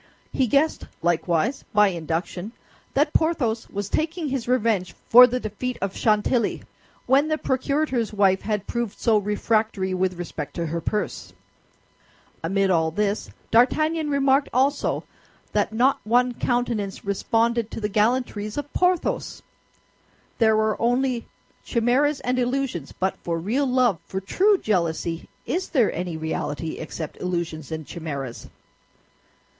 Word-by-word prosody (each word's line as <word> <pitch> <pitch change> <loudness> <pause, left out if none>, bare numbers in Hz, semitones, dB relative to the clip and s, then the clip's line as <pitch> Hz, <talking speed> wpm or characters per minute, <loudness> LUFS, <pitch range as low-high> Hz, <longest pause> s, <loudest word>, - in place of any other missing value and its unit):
He 260 - +2
guessed, 285 +6 +1 0.2
likewise, 175 - +1
by 210 -1 +6
induction, 175 +4 -4 0.4
that 295 +2 +2
Porthos 260 -9 +1
was 200 -1 -4
taking 315 - -1
his 260 -3 -3
revenge 215 -8 +1
for 250 +2 +10
the 250 +1 -2
defeat 240 +3 -4
of 195 0 -3
Chantilly, 215 +1 +1 0.4
when 275 +4 +4
the 310 0 0
procurator's 260 -3 0
wife 195 -2 +3
had 210 -2 -2
proved 235 -4 -3
so 220 -3 +3
refractory 210 -1 0
with 185 -1 0
respect 165 -4 -6
to 170 - -2
her 165 +1 -3
purse. 210 +4 -3 1.1
Amid 195 +3 +1
all 160 -2 +2
this, 205 +4 -1 0.2
D'Artagnan 310 +7 +3
remarked 275 0 +2
also 270 +3 +1 0.5
that - - +1
not 250 +5 +3
one 245 +3 +2
countenance 235 -6 -1
responded 230 +3 +1
to - - -6
the 210 - -1
gallantries 215 0 0
of 290 0 -5
Porthos. 360 -1 0 1.0
There 220 -2 +5
were 215 0 0
only 245 0 +1 0.4
chimeras 260 +5 +1
and 250 +1 0
illusions; 250 - -1
but 190 +1 -2
for 170 -1 -3
real 235 +12 0
love, 250 -8 +2
for 190 - -3
true 390 - +3
jealousy, 170 - -1 0.2
is 365 +2 -2
there 245 -8 +2
any 175 -1 -3
reality 160 0 -3
except 160 0 -6
illusions 170 -5 -3
and 160 -1 -4
chimeras? 140 -8 -6
220 Hz, 135 wpm, -24 LUFS, 185-255 Hz, 1.1 s, for